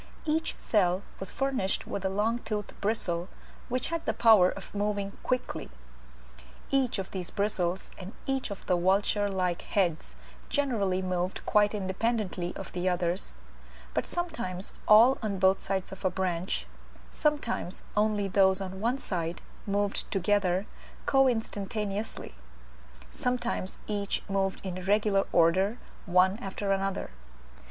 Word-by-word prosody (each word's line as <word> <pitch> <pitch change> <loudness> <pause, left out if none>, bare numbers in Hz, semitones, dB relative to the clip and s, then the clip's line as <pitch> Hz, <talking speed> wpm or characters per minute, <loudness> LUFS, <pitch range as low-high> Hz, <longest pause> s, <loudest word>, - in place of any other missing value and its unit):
each 320 +1 0
cell 185 -3 +2 0.2
was 195 - -4
furnished 265 -8 0
with 195 - -4
a 190 - +1
long 215 +5 +1
toothed 210 -3 -4
bristle, 185 -4 -1 0.4
which 255 +1 -1
had 335 -1 -2
the - - +2
power 215 -6 +7
of 195 - -8
moving 205 -1 -1
quickly. 255 -1 -2 1.0
Each 265 -4 +2
of 190 -1 -4
these 180 -3 -4
bristles 190 -3 -1
and 190 +1 -7
each 270 -2 -1
of 200 - -7
the 180 - +3
vulture 200 +3 +2
like 180 -3 0
heads 175 -6 0 0.3
generally 205 -10 +1
moved 185 0 -2
quite 210 0 +4
independently 195 -2 -1
of 195 - -7
the 180 +1 +1
others, 175 - -1 0.6
but - - 0
sometimes 240 - -4
all 230 +5 +7
on 210 -3 -1
both 190 +1 +4
sides 190 -1 -2
of 190 - -9
a 185 - +3
branch, 180 -1 -1 0.5
sometimes 290 - -1
only 210 -1 +2
those 190 0 +4
on 190 0 -5
one 240 +4 +1
side, 170 -8 -3 0.3
moved 200 0 0
together 195 -1 +2 0.4
coinstantaneously, 215 - 0 0.8
sometimes 240 -6 -2
each 205 -1 -2
moved 195 -1 -1
in 185 -1 -4
regular 205 0 +3
order 185 +6 +4 0.3
one 185 +3 +4
after 195 -1 -3
another. 195 - -1
195 Hz, 130 wpm, -29 LUFS, 185-215 Hz, 1.0 s, power